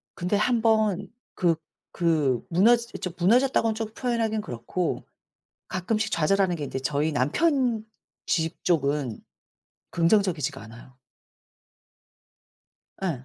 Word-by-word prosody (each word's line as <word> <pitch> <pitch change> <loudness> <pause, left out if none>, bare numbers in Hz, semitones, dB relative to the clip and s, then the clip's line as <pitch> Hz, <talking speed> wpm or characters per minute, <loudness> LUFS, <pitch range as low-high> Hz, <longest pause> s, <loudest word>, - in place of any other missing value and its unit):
근데 180 +4 -1
1 230 +2 +2
번 215 -4 +2 0.3
그 170 -2 +2 0.4
그 155 -7 +1
무너지 230 +7 +4
저 180 - -2
무너졌다곤 225 +4 +3
좀 220 0 -5
표현하긴 230 -3 -1
그렇고 160 - -3 0.6
가끔씩 215 +4 -1
좌절하는 180 +3 +2
게 150 - -4
이제 135 - -4
저희 145 +3 0
남편 240 - +1 0.4
집 160 -2 -1
쪽은 140 -7 0 0.7
긍정적이지가 165 -6 +1
않아요. 115 +3 -14 2.0
예. 150 -9 -2
180 Hz, 220 characters per minute, -26 LUFS, 150-220 Hz, 2.0 s, 무너지